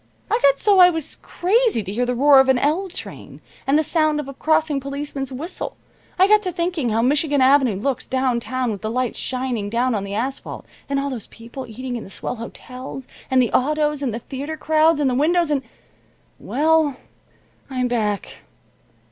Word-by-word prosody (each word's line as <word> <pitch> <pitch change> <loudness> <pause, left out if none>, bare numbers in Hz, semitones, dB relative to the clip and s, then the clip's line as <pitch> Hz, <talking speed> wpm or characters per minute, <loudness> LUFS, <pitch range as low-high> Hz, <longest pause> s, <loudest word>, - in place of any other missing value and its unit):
I 450 - +3
got 275 0 +5
so 405 +2 +3
I 360 0 +9
was 325 -4 -4
crazy 420 - +1
to 195 +1 -6
hear 245 +3 0
the 250 - 0
roar 280 +2 +6
of 265 0 +4
an 260 - +4
L 315 +9 +1
train, 360 - -8 0.3
and 275 +2 +4
the 310 - +3
sound 310 -1 +1
of 295 - -5
a 275 - -7
crossing 310 0 +1
policeman's 275 0 -5
whistle. 300 +8 -6 0.4
I 375 +1 +5
got 425 0 +5
to 370 -3 -1
thinking 340 -6 -1
how 225 +1 +1
Michigan 285 +2 +2
Avenue 260 -4 +4
looks, 255 +7 -2
downtown, 255 -1 -1
with 200 - -6
the 215 - -3
lights 250 +1 -1
shining 250 -5 -2
down 240 +3 +1
on 205 -3 -1
the 200 0 -5
asphalt, 260 +5 -4 0.2
and 275 0 0
all 280 0 -2
those 235 -5 -6
people 235 +3 -9
eating 245 +2 -5
in 230 - -7
the - - -11
swell 240 - -4
hotels, 255 +3 -8 0.2
and 260 - +3
the 235 - -2
autos, 300 +2 +1
and 265 -4 -1
the 220 - -3
theater 280 +6 -6
crowds 315 0 +3
and 290 - +2
the 255 - +1
windows, 320 +4 +2
and 280 -2 +1 0.8
well, 305 -1 +1 0.7
I'm 255 -2 -1
back. 215 -4 -2
270 Hz, 195 wpm, -21 LUFS, 245-310 Hz, 0.8 s, I